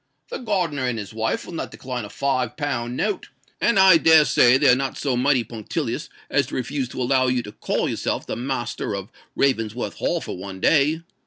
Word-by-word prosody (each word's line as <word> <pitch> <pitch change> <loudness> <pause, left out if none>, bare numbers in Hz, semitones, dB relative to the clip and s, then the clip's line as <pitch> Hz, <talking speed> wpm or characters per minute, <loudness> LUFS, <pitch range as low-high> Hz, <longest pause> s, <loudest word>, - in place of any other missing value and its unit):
"The 485 - -5
gardener 175 - -1
and 125 -2 -1
his 105 -1 -7
wife 110 0 -2
will - - -9
not 165 - -4
decline 125 -3 -6
a - - -10
five 130 -3 -1
pound 125 -5 -2
note; 210 -3 -2 0.3
and 235 - +3
I 190 -3 +8
dare 160 -1 +6
say 125 -1 +5
they 145 +1 +3
are 125 - +7
not 135 0 -3
so 135 -3 -1
mighty 130 0 +2
punctilious 110 -1 -4 0.2
as - - +1
to - - -6
refuse 130 0 -2
to 130 - -5
allow 130 +1 +2
you 125 -1 +1
to 105 - -9
call - - -2
yourself - - -2
the - - -4
master 120 -4 -3
of 100 0 -7 0.2
Ravensworth 120 -4 0
Hall - - 0
for - - -6
one 95 +1 -8
day. 155 - +3
130 Hz, 210 wpm, -23 LUFS, 120-145 Hz, 0.3 s, I